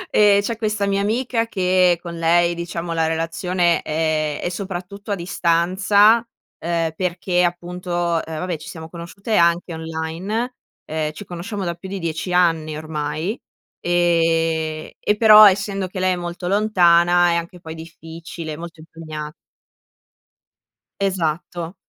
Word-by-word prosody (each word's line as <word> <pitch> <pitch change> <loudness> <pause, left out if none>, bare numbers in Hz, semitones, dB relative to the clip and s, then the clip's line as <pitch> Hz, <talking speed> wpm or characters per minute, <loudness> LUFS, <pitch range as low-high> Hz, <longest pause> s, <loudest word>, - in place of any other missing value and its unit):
Ehm, 205 -1 +6
c'è 230 +3 -2
questa 215 -2 -1
mia 200 0 +1
amica 230 +2 0
che 185 -4 +3
con 170 -1 -7
lei 170 +1 +3
diciamo 170 0 -4
la 165 -1 +1
relazione, 170 +2 0
ehm, 155 -1 -1
è - - -2
soprattutto 195 +2 -6
a - - +1
distanza, 190 +6 +3 0.3
ehm, 165 -1 -1
perché 180 0 0
appunto, 175 +1 -3
uhm, 175 -1 +1
vabbè 160 +2 -4
ci 155 - -10
siamo 160 -1 -8
conosciute 180 +6 -5
anche 170 0 +2
online. 165 +9 -4 0.3
Uhm, 155 -1 -2
ci 190 +6 -10
conosciamo 185 +3 -5
da 170 - -1
più 190 +2 -10
di 195 -1 -4
10 165 +2 -3
anni 165 -3 +2
ormai, 155 +6 -3 0.4
ehm, 165 -2 +1
e 210 - +1
però 215 -1 +9
essendo 195 0 -2
che 185 +1 -7
lei 185 0 +2
è - - -1
molto 175 +1 -5
lontana 175 -4 +4
è - - +1
anche 170 +1 -4
poi 160 -1 -8
difficile, 165 0 -8
molto 170 0 -9
impegnat 155 -1 -8 1.7
Esatto. 175 -1 -2
175 Hz, 140 wpm, -21 LUFS, 165-190 Hz, 1.7 s, però